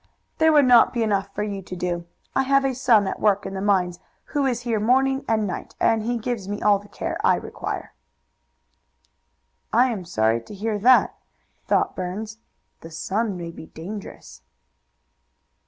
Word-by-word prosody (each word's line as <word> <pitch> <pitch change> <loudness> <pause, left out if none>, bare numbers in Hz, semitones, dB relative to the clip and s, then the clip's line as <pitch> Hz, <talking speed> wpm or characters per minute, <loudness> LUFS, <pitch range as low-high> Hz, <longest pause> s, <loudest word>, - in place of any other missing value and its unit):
"There 320 0 +5
would 295 -3 +5
not 245 -2 +6
be 235 -2 0
enough 200 -2 0
for 210 - -1
you 200 -2 -4
to 180 0 -8
do. 175 -1 -3 0.3
I - - +4
have 275 +1 +2
a 265 - +1
son 240 -5 +3
at - - -4
work 205 -1 +2
in - - -5
the 190 - -4
mines 185 -3 +1 0.3
who 285 -2 +2
is 245 -2 -1
here 235 -3 -1
morning 265 +5 +2
and 220 -1 +1
night, 185 - -6
and 225 -1 +3
he 240 +2 -1
gives 225 -4 -4
me 205 0 -3
all 205 -1 +3
the 205 - -15
care - - -4
I - - +5
require." - - -6 1.8
"I 250 +1 +4
am 195 -6 -5
sorry 115 -7 +1
to 205 - -11
hear 210 +1 -2
that," 250 +4 +5 0.5
thought - - +1
Burns. 210 +5 -5 0.4
"The 165 - -11
son 195 +5 -2
may 170 -1 -6
be 160 - -11
dangerous." 195 +6 -9
210 Hz, 175 wpm, -23 LUFS, 190-240 Hz, 1.8 s, not